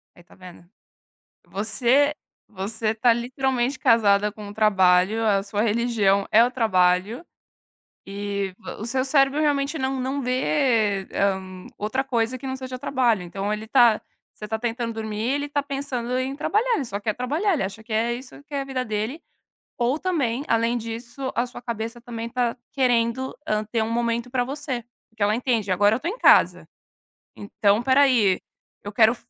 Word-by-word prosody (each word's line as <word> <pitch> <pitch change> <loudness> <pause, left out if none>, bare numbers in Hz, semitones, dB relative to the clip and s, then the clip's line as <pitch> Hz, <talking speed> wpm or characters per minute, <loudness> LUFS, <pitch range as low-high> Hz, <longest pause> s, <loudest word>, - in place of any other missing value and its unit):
Aí, 175 - -17
tá - - -20
vendo. 180 -2 -13 0.8
Você 240 +8 +2 0.3
você 215 +2 -3
tá 235 +2 +3
literalmente 255 +2 -1
casada 210 -2 +4
com 210 0 -10
o - - -8
trabalho. 200 0 +3
A 200 -3 +2
sua 205 +1 -2
religião 215 -3 +2
é 225 +2 +6
o 245 - 0
trabalho, 205 - +1 0.8
e 200 -1 -4 0.2
o 215 - -6
seu 260 +2 0
cérebro 275 +1 +3
realmente 290 0 +1
não 265 0 -1
não 270 +2 -2
vê, 245 -6 +1
hã, 190 -2 -2
outra 255 +6 -2
coisa 240 -1 -1
que 270 - -8
não 260 0 -3
seja 260 -1 -7
trabalho. 250 -7 +1
Então, 195 +4 -4
ele 215 +1 -4
tá 235 -2 +5 0.3
você 210 - -9
tá 220 +1 -3
tentando 235 0 -2
dormir, 220 -1 -5
ele 285 +1 -1
tá 290 0 -1
pensando 270 -3 -3
em 265 +2 -2
trabalhar, 450 +10 +1
ele 290 - -1
só 200 -4 -5
quer 215 0 -1
trabalhar, 305 - 0
ele 310 - -1
acha 195 +3 -5
que 225 - -24
é 225 +2 +1
isso 255 +3 -8
que 295 - -11
é 280 - 0
a - - -3
vida 265 -2 -3
dele. 220 +7 -3 0.6
Ou 245 +4 +1
também, 280 -8 -1
além 230 +1 +1
disso, 240 +3 -5
a 240 - 0
sua 245 - -10
cabeça 230 -1 -5
também 230 -1 -6
está 240 0 -1 0.2
querendo, 250 -1 +1
hã, 215 -6 0
ter 225 +1 -2
um 220 - -1
momento 235 +1 -1
pra 250 0 0
você, 265 -2 -4 0.3
porque 220 -2 -4
ela 205 +1 +3
entende: 230 -5 0
"Agora 205 +3 +4
eu - - -3
tô 330 - -4
em 410 +7 -3
casa, - - +5 0.7
então 205 +1 +1
pera 260 +2 +4
aí, 230 -9 +3 0.4
eu 205 - -6
quero 225 +2 +4
235 Hz, 180 wpm, -24 LUFS, 210-260 Hz, 0.8 s, é